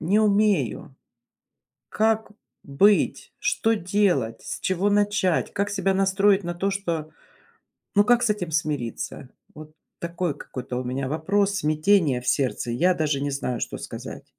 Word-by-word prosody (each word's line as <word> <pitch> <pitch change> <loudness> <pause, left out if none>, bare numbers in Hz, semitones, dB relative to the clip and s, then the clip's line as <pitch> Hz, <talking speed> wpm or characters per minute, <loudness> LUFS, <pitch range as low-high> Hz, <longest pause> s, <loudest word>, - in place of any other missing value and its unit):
не 195 +7 +2
умею. 210 -1 +1 1.0
Как 220 0 +1 0.3
быть, 195 +10 +2
что 225 - +1
делать, 180 - 0
с - - -6
чего 190 +2 0
начать, 205 -3 +1
как 200 0 -1
себя 195 -1 0
настроить 195 +1 +3
на 175 0 -3
то, 195 +3 -1
что 170 -6 -3 0.8
ну, 205 - +6
как 245 +2 +3
с 240 - +2
этим 185 -6 -2
смириться? 145 -5 -3 0.2
Вот 155 0 -12 0.3
такой 170 -3 -3
какой-то 125 -1 -6
у 130 - -2
меня 130 +1 -3
вопрос, 195 +6 0
смятение 155 -4 +2
в 125 - -10
сердце, 130 -3 0
я 180 +10 +3
даже 150 -4 -1
не 140 0 -2
знаю, 125 -4 -3
что - - -4
сказать. - - -8
180 Hz, 145 wpm, -24 LUFS, 150-205 Hz, 1.0 s, ну